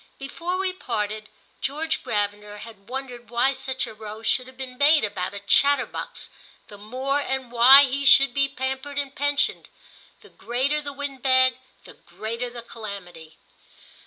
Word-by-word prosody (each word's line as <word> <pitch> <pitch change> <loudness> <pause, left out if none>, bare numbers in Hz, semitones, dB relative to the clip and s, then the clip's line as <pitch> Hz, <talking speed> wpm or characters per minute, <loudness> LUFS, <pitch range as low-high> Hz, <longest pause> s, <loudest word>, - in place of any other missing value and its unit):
Before 335 +6 -4
we 380 -1 -1
parted 215 - -4 0.3
George 310 +4 -2
Gravener 205 0 -3
had 220 -3 -13
wondered 250 -2 -7
why 240 +3 +2
such 265 0 -3
a - - -9
row 215 0 -9
should 255 +3 -1
be 265 - -4
made 285 +4 +3
about 195 -2 -4
a - - -5
chatterbox 280 +8 +1 0.4
the 205 - -12
more 260 +7 -2
and 265 -3 -3
why 255 +4 +9
he 275 +1 -1
should 275 -1 +7
be 275 0 +2
pampered 265 +1 -4
and 280 -1 -2
pensioned. 285 0 0 0.5
The - - -17
greater 265 +5 -1
the 290 -1 -5
wind 280 -2 -5
bag 260 -1 +3 0.2
the - - -13
greater 230 +3 -6
the 240 -1 -9
calamity. 195 -9 -9
260 Hz, 155 wpm, -24 LUFS, 220-275 Hz, 0.5 s, why